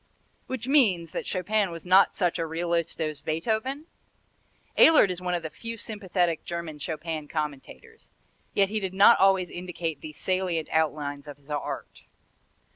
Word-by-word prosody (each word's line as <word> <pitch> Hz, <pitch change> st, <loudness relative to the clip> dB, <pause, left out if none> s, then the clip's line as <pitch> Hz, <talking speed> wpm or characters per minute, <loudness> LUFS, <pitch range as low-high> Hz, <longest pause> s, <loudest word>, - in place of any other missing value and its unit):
Which 260 Hz, -2 st, -4 dB
means 200 Hz, -, +3 dB
that -, -, -4 dB
Chopin 200 Hz, +2 st, 0 dB
was 165 Hz, 0 st, -9 dB
not 185 Hz, +2 st, +5 dB
such 180 Hz, -2 st, 0 dB
a 165 Hz, -, 0 dB
realist 170 Hz, +1 st, -2 dB
as 155 Hz, -3 st, -3 dB
Beethoven? 220 Hz, -, -2 dB, 0.9 s
Ehlert 300 Hz, -, +7 dB
is 180 Hz, 0 st, -6 dB
one 180 Hz, -1 st, -1 dB
of 170 Hz, -, -3 dB
the 160 Hz, -, -5 dB
few 230 Hz, 0 st, -6 dB
sympathetic 185 Hz, -6 st, -1 dB
German 170 Hz, -3 st, -5 dB
Chopin 155 Hz, 0 st, -4 dB
commentators, 155 Hz, -, -6 dB, 0.5 s
yet 195 Hz, -1 st, +3 dB
he 215 Hz, +1 st, -1 dB
did 190 Hz, -2 st, -4 dB
not 200 Hz, +4 st, +7 dB
always 190 Hz, -2 st, +3 dB
indicate 175 Hz, -3 st, -5 dB
the 155 Hz, -, -8 dB
salient 185 Hz, -1 st, -1 dB
outlines 150 Hz, -2 st, -1 dB
of 145 Hz, -1 st, -9 dB
his 145 Hz, +1 st, -15 dB
art. 145 Hz, -, -5 dB
175 Hz, 155 wpm, -27 LUFS, 160-200 Hz, 0.9 s, Ehlert